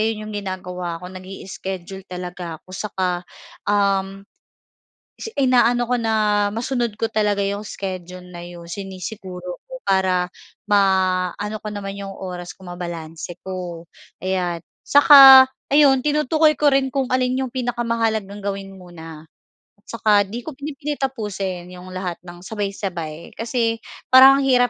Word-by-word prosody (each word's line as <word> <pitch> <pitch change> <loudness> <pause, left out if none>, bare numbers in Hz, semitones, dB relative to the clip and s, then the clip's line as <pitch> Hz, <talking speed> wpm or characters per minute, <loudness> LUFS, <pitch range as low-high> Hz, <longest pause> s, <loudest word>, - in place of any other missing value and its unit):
yan 215 -1 -1
yung 215 - -7
ginagawa 180 -3 -4
ko, 180 - -8
nag-i-schedule 190 0 -7
talaga 180 -2 -6
ako 185 +3 -18
saka, 185 -3 -2 0.5
um, 195 -1 +1 1.0
si - - -5
ina-ano 245 -2 +3
ko 245 0 0
na 210 -2 +2
masunod 235 +1 -2
ko 225 - -2
talaga 205 -2 +1
'yong 200 +1 -2
schedule 185 -3 -6
na 175 - -8
'yon, 175 0 -10
sinisiguro 185 0 -7
ko, - - -9
para 185 -2 +1 0.3
ma-ano 190 0 +1
ko 215 - -6
naman 205 -1 -5
'yong 195 0 -7
oras 180 -2 -7
ko, 190 - -16
mabalanse 170 -2 -7
ko. 180 -3 -6 0.4
Ayan. 180 -3 -1 0.2
Saka 275 -2 +10 0.2
ayun, 280 -2 +5
tinutukoy 300 +2 +2
ko 290 -2 +3
rin 270 0 +3
kung 270 0 -1
alin 255 0 +1
'yong 250 - -7
pinakamahalagang 230 -5 -1
gawin 195 -1 -4
muna. 165 -3 -11 0.5
At - - -57
saka 210 -2 +3
'di 225 +4 -5
ko 315 - -6
pinipilit 290 +1 -5
tapusin 200 -9 -3
yung 180 0 -10
lahat 185 -2 -5
ng 175 +1 -12
sabay-sabay 185 -6 -5
kasi 230 -1 -1 0.3
parang 265 +1 +9
ang 275 - 0
hirap, 250 -2 +4
200 Hz, 140 wpm, -21 LUFS, 180-235 Hz, 1.0 s, Saka